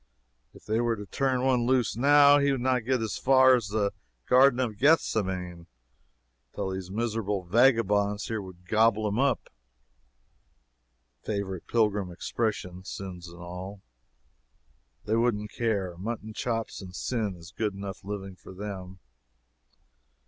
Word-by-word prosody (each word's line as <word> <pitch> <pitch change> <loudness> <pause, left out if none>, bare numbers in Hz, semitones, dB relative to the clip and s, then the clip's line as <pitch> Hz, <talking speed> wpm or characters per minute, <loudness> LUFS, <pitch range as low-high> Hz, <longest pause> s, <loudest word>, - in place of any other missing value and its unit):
If - - -17
they 110 +2 0
were 120 -1 +1
to 105 -1 -8
turn 130 +3 0
one 125 -3 +2
loose 130 -3 +2
now, 145 +3 +6
he 140 0 +2
would 135 - 0
not 125 -2 0
get 130 -2 +1
as 110 - -3
far 130 0 +6
as 120 -5 +1
the 100 -1 0 0.3
Garden 130 0 +5
of 110 -5 -2
Gethsemane, 95 - +1 0.9
till 95 - -2
these 95 -1 -5
miserable 105 -2 -2
vagabonds 105 -1 +3
here 110 -2 -3
would 90 -2 -12
gobble 110 +1 +3
him 105 +3 -1
up, 140 -1 0 1.7
[Favorite 100 -4 -4
pilgrim 105 -5 +1
expression.] 90 0 -3
sins 90 -3 -7
and 85 +1 -11
all. 95 +3 -8 1.2
They 110 - +1
wouldn't 105 -3 0
care. 100 -7 -1
Mutton 110 +2 -5
chops 115 -1 -3
and 90 -1 -10
sin 110 -5 -2
is 85 0 -13
good 105 -3 -1
enough 100 0 -7
living 95 -1 -6
for 90 +1 -13
them. 95 -2 -7
105 Hz, 140 wpm, -28 LUFS, 95-120 Hz, 1.7 s, now